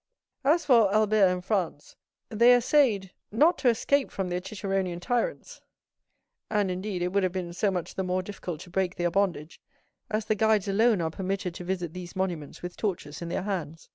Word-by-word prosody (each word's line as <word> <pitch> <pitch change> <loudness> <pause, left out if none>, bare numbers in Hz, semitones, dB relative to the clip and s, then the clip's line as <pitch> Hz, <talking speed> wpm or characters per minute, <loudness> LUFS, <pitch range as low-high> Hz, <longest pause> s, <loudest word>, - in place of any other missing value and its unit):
As 315 +5 +3
for 230 -7 +5
Albert 215 -1 +4
and 180 0 -2
Franz, 180 -8 -2 0.3
they 235 +3 +6
essayed 235 -7 +2 0.2
not 295 +9 +4
to 265 -2 +4
escape 265 +4 +1
from 190 -2 -3
their 180 0 -2
ciceronian 190 -3 -2
tyrants; 250 - -2 0.9
and, 205 -3 +1
indeed, 185 0 -3
it 180 - 0
would 200 +2 +1
have 185 -1 +1
been 180 -2 -4
so 200 +3 +1
much 180 -3 -3
the - - -2
more 185 0 -1
difficult 180 -5 -6
to 180 -1 -12
break 185 0 0
their 175 0 0
bondage, 175 -4 -1 0.5
as 215 0 -1
the 215 - +2
guides 215 -2 +2
alone 215 0 +3
are 160 -1 -1
permitted 190 +1 -3
to 180 - -8
visit 175 -3 -3
these 180 +1 -8
monuments 175 -7 -3
with 180 0 -6
torches 175 -8 -3
in 170 - -5
their 175 - -2
hands. 170 -6 -4
190 Hz, 190 wpm, -27 LUFS, 180-215 Hz, 0.9 s, they